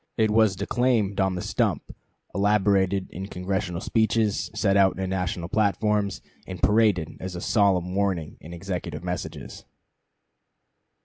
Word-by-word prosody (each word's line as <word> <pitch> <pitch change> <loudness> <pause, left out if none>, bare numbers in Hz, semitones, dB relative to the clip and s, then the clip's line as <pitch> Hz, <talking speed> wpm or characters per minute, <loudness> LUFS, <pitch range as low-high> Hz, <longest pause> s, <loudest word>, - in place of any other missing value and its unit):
It 110 -2 +2
was 110 -3 +4
declaimed 105 -1 0
on 95 -1 +1
the 90 - -4
stump, - - -1 0.4
elaborated 100 -2 +2
in 95 +2 -6
Congressional 90 -1 -3
speeches, 110 -2 +1
set 100 -3 +2
out 95 -1 +4
in 95 -1 -2
national 90 -2 -2
platforms, 105 0 0 0.2
and 90 -2 -7
paraded 105 -6 +2
as 95 -1 -6
a - - -4
solemn 95 -4 +2
warning 95 -6 -1
in 80 - -11
executive 85 -3 -5
messages. 90 0 -6
95 Hz, 130 wpm, -25 LUFS, 90-105 Hz, 0.4 s, was